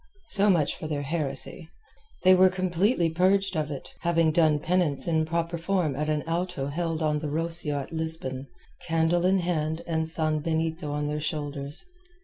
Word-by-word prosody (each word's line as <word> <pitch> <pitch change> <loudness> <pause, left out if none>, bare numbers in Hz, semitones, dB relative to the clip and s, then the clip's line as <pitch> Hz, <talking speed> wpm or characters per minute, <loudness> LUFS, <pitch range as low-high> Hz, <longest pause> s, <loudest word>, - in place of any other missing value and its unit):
So 205 0 +6
much 160 -6 +2
for 155 - -6
their 145 -2 -3
heresy. 150 +2 -2 0.5
They 185 0 +7
were 185 0 +6
completely 185 0 +1
purged 190 +3 +2
of 155 -1 -1
it, 140 -3 -7
having 165 -2 +2
done 155 -2 +3
penance 165 -2 0
in 160 -2 +1
proper 170 +1 -2
form 170 -5 0
at 150 +2 -2
an 150 -1 0
Auto 170 -3 -2
held 165 +1 -2
on 150 -1 +1
the 150 -1 -4
Rocio 165 -1 +1
at 140 +3 -6
Lisbon, 160 -5 -4 0.4
candle 165 +2 +2
in 190 +1 +3
hand 160 -1 -2
and 160 -1 -1
sanbenito 160 0 -1
on 150 0 -2
their 150 0 -3
shoulders. 145 - -3
160 Hz, 165 wpm, -26 LUFS, 150-175 Hz, 0.5 s, They